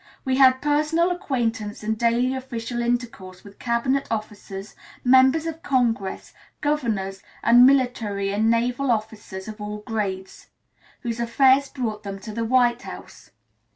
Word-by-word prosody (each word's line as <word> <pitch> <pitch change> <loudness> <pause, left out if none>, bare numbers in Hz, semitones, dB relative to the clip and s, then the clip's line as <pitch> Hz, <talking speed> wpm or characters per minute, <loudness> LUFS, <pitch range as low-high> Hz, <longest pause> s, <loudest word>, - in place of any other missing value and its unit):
We 260 -1 +1
had 260 -1 +5
personal 305 +4 +2
acquaintance 225 -11 -2
and 220 +1 -1
daily 235 +3 +1
official 240 -2 -4
intercourse 235 -6 -3
with 200 -1 -15
Cabinet 255 +3 0
Officers, 210 -2 -6 0.3
Members 260 +5 +5
of 325 0 -5
Congress, 235 -7 -1 0.3
Governors, 220 -10 -1 0.2
and 245 +2 +7
Military 230 -7 +1
and 215 +2 +1
Naval 245 +4 +1
Officers 215 -4 -3
of 215 0 -8
all 210 0 -6
grades, 195 -5 -4 0.5
whose 235 -1 -4
affairs 265 +4 +3
brought 225 -6 -4
them 200 -1 -6
to 215 - -7
the 230 +2 -3
White 240 0 +2
House. - - -11
235 Hz, 135 wpm, -23 LUFS, 210-260 Hz, 0.5 s, and